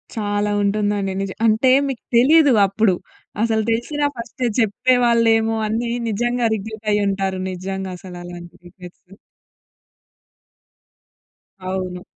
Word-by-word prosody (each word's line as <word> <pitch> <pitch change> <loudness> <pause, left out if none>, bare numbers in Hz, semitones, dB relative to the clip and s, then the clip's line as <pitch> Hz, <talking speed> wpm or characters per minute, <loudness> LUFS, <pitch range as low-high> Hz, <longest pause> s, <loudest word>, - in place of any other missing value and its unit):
చాలా 205 -1 -1
ఉంటుందండి. 205 -1 0
నిజ 195 -1 -3
అంటే 220 +4 +3 0.2
మీకు 265 -4 -5
తెలీదు 285 +2 +5
అప్పుడు. 200 -1 +1 0.5
అసలు 220 -1 +1
తెలిసినా 290 +6 -1
ఫస్టే 240 +2 -4
చెప్పేవాళ్ళేమో 230 0 +2
అనీ 230 +2 -2 0.2
నిజంగా 240 +2 0
రిగ్రెట్ 220 +1 -8
అయ్యి 205 0 +1
ఉంటారు. 195 -1 -2
నిజంగా 190 +1 -5
అసలు 180 -1 -10
అలాంటి 175 -1 -10
రిగ్రెట్. 180 -1 -14 2.6
అవును. 185 -1 -5
215 Hz, 105 wpm, -20 LUFS, 190-235 Hz, 2.6 s, తెలీదు